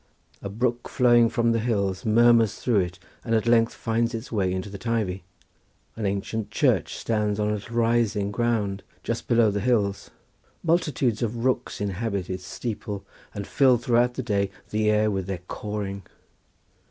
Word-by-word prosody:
A 100 - -5
brook 120 +3 -1
flowing 120 -2 +4
from 115 0 +1
the 115 - +1
hills 100 -5 -1
murmurs 115 -1 +5
through 115 -5 +1
it 90 0 -2 0.3
and 115 -1 0
at 110 - +1
length 115 -1 +3
finds 115 +1 0
its 110 - -7
way 95 -5 +1
into 95 +1 -3
the 100 -1 -8
Teivi—an 100 0 -5
ancient 100 +2 -3
church - - +1
stands 105 -2 -1
on 105 0 +1
a - - +1
little 105 +3 -6
rising 115 -3 +1
ground 105 -3 0 0.2
just - - -3
below 115 -3 +4
the 100 - -1
hills, 100 -4 0 0.5
multitudes 150 -9 +1
of 115 +1 -2
rooks 130 -1 0
inhabit 100 -1 -2
its 95 0 -6
steeple 105 -4 -5 0.3
and 100 - -4
fill 130 +1 +4
throughout 120 +1 +2
the 130 - -3
day 100 -4 0 0.2
the 105 0 +1
air 105 0 +3
with 95 -2 -2
their 95 -3 -4
cawing. 100 -2 -4
110 Hz, 165 wpm, -25 LUFS, 100-120 Hz, 0.5 s, murmurs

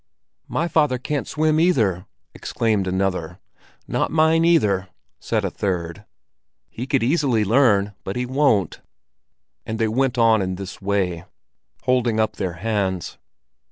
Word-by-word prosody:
"My 165 - -1
father 150 -6 +2
can't 140 +3 -3
swim, 155 0 +1
either!" 110 - +1 0.3
exclaimed 105 -4 -1
another. 95 -3 -2 0.5
"Nor - - -1
mine, 160 +1 +3
either!" 105 - +2 0.3
said - - -1
a - - -2
third. 85 -4 -3 0.7
"He 125 +3 -6
could 135 -4 +1
easily 130 -5 +2
learn, 105 -3 +3
but 95 - -5
he 125 - -1
won't." 130 -7 +1 0.8
And 110 - -4
they 115 0 +1
went 125 +2 0
on 115 -2 +4
in 95 -1 -2
this 95 +1 -8
way, 95 -4 -1 0.6
holding 120 -3 +1
up 110 - 0
their 95 -4 -2
hands. 95 -2 -2
110 Hz, 135 wpm, -22 LUFS, 95-135 Hz, 0.8 s, on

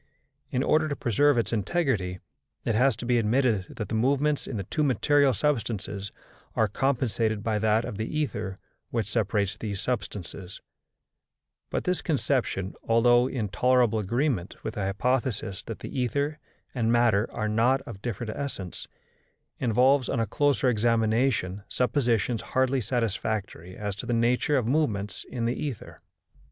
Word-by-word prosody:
In 130 - 0
order 155 +1 +3
to 145 - -1
preserve 140 +4 +3
its 115 -1 0
integrity, 105 - 0 0.5
it 115 - +1
has 125 +5 +3
to - - -7
be 120 0 +3
admitted 115 -3 +2
that 110 - -4
the - - -4
movements 140 +6 +1
in 115 - -4
the 100 - -3
two 155 - -2
material 145 0 +3
substances 105 -7 -2 0.4
are 110 - +3
compensated 115 -3 0
by 110 -2 0
that 110 +1 +2
of 100 - -5
the 115 +7 -2
ether 105 -10 -3 0.3
which 115 -3 -1
separates 105 -2 0
these 105 -3 -4
substances; 100 -6 -4 1.1
but - - -2
this 180 0 0
conception, 130 - 0
although 120 +2 +5
in 120 -6 -2
tolerable 120 +1 +3
agreement 115 - -1
with 110 - -3
the 105 - -4
hypothesis 115 -1 -1
that 115 - -7
the 140 - -5
ether 140 +5 -1 0.3
and 115 -3 +1
matter 115 -3 +3
are 110 - -2
not 120 +5 +2
of 115 -7 -10
different 110 -1 -4
essence, 100 -11 -5 0.7
involves, 125 +3 +3
on 130 - 0
a 115 - +2
closer 140 +4 +1
examination, 115 -3 +1
suppositions 120 -3 +1
hardly 130 0 +1
satisfactory 105 -6 -2
as 105 -2 -3
to 115 - -7
the 120 - 0
nature 120 +5 +2
of 125 - 0
movements 110 -8 0
in 120 -3 -2
the 120 - +1
ether. 140 -8 -6
115 Hz, 150 wpm, -27 LUFS, 105-130 Hz, 1.1 s, although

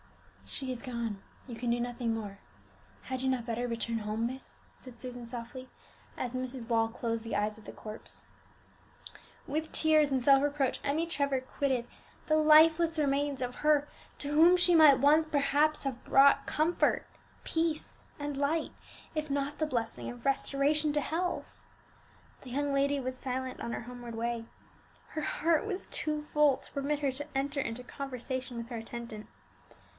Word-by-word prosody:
"She 265 -2 -4
is 245 -2 -5
gone; 235 -5 -4 0.3
you 240 - -6
can 240 +1 -3
do 240 +1 +2
nothing 240 -1 -1
more. 205 -3 -5 0.6
Had 260 -1 -3
you 265 - +1
not 255 -3 0
better 240 +1 -2
return 230 -1 -1
home, 215 +2 -2
miss?" 260 +2 -6 0.2
said 250 -2 -13
Susan 245 -2 -7
softly, 240 +2 -7 0.5
as 245 -1 -3
Mrs. 255 -2 -4
Wall 225 -1 +2
closed 230 -1 -3
the 225 -3 -2
eyes 210 +1 -1
of 220 - -14
the - - -8
corpse. 215 0 -4 1.2
With 310 +2 -2
tears 310 -2 +4
and 265 -1 +1
self 275 +2 +6
reproach 285 -3 0
Emmie 295 +4 +1
Trevor 280 -4 0
quitted 260 -1 -1 0.4
the 310 - +2
lifeless 315 +1 +6
remains 280 -1 +1
of 250 0 -3
her 300 -1 +3 0.3
to 285 - -5
whom 330 +5 +6
she 355 -1 +4
might 305 -4 +8
once 300 +4 +5
perhaps 295 0 +2
have 260 -3 -3
brought 275 +1 +5
comfort, 320 +3 +1 0.4
peace, 325 -1 -2
and 290 0 -3
light, 295 +3 0 0.4
if 305 -1 -2
not 280 +1 -2
the 310 - +1
blessing 230 -5 -3
of 245 0 -10
restoration 285 +2 +2
to 295 - +2
health. 350 +5 -2 1.0
The 260 - -11
young 285 +3 -1
lady 280 +1 +2
was 255 -1 -4
silent 260 0 -4
on 235 - -3
her - - -3
homeward 240 -1 -8
way; 230 0 -2 0.6
her 310 - -4
heart 320 +2 +1
was 390 -3 -3
too 305 -1 -2
full 300 -2 +3
to - - -14
permit 285 +1 -1
her 280 -2 +1
to 275 +1 -4
enter 280 +1 0
into 245 0 -4
conversation 255 -1 -5
with 235 0 -5
her 240 - -4
attendant. 225 -1 -7
270 Hz, 170 wpm, -31 LUFS, 240-295 Hz, 1.2 s, might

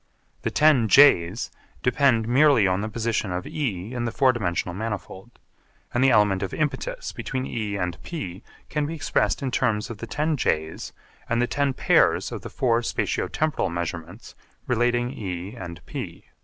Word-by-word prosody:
The - - -1
ten 150 -7 +4
J's 105 -6 +5 0.3
depend 125 -4 +3
merely 135 -2 +5
on 95 +1 +1
the 110 - -3
position 110 -3 -1
of 90 0 -3
E 115 - -3
in 120 -1 -2
the 115 - -2
four 130 0 +3
dimensional 90 -6 -2
manifold, 105 +1 -6 0.6
and 120 - +2
the 135 - +6
element 105 -5 +4
of 95 - -3
impetus - - -2
between 130 -1 -4
E 110 -5 -3
and 90 -3 -3
P 110 - -6 0.3
can 150 -1 -1
be 165 - -4
expressed 145 - 0
in 130 - -1
terms 115 -2 0
of 110 - -8
the 115 - -6
ten 150 +4 0
J's 80 - -1 0.4
and 115 - +1
the 120 - +3
ten 140 +1 0
pairs - - +3
of - - -5
the - - -7
four 120 -2 +1
spatio 115 - -2
temporal 155 -1 0
measurements 85 +3 -5 0.3
relating 120 -1 +1
E 95 -5 -5
and 85 -7 -8
P. - - -7
115 Hz, 170 wpm, -24 LUFS, 95-135 Hz, 0.6 s, the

